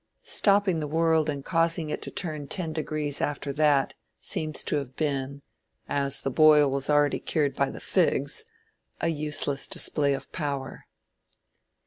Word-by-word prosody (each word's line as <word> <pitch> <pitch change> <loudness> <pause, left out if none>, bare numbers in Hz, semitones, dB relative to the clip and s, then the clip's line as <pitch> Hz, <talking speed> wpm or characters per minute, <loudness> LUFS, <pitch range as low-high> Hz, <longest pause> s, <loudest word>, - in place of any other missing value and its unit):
Stopping 200 -4 +3
the 150 - -3
world 160 0 +1
and 140 -2 -4
causing 165 -2 0
it - - -4
to - - -4
turn 155 -5 -4
back - - -17
ten 165 -4 -3
degrees 155 -2 -3
after 145 -1 -3
that, 145 -2 +2 0.3
seems 155 -1 -2
to - - 0
have 135 -3 -6
been, 140 -2 -3 0.4
as 140 -1 0
the 135 - -2
boil 150 0 +5
was 140 +1 -2
already 145 -1 +3
cured 145 -3 -1
by - - +1
the - - -8
figs, 445 - 0 0.6
a 165 - 0
useless 150 -3 0
display 140 -2 +2
of 135 - -10
power. 140 -4 -5
150 Hz, 155 wpm, -26 LUFS, 140-160 Hz, 0.6 s, boil